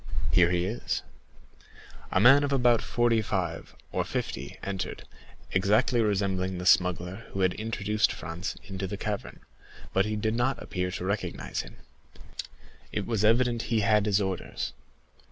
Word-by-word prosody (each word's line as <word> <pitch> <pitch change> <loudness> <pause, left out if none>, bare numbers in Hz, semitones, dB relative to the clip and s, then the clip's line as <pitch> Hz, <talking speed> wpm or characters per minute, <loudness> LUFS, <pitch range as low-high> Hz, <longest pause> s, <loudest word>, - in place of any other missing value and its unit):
Here 85 -1 +5
he 90 0 +1
is." 110 +6 -2 1.1
A - - +3
man 135 +7 +7
of 140 - 0
about 125 -4 +4
forty 120 -2 +2
five 90 -5 -3 0.2
or - - 0
fifty - - -4
entered, 95 -2 -4 0.5
exactly 105 +5 +3
resembling 95 -3 0
the 90 - -5
smuggler 90 +3 +2
who 95 - -2
had 95 -1 +3
introduced 105 -1 0
Franz 85 +2 -5
into 95 -1 -4
the - - -4
cavern; - - -4 0.5
but 95 +1 +3
he 105 - -1
did 110 +1 0
not 120 +3 0
appear 90 -1 -3
to 90 0 -4
recognize 100 +2 -2
him. - - -12 1.2
It 105 - -2
was 110 -3 0
evident 120 +1 +3
he 115 -2 +2
had 105 0 +3
his 100 -1 +3
orders. 95 -3 -3
100 Hz, 150 wpm, -28 LUFS, 95-115 Hz, 1.2 s, man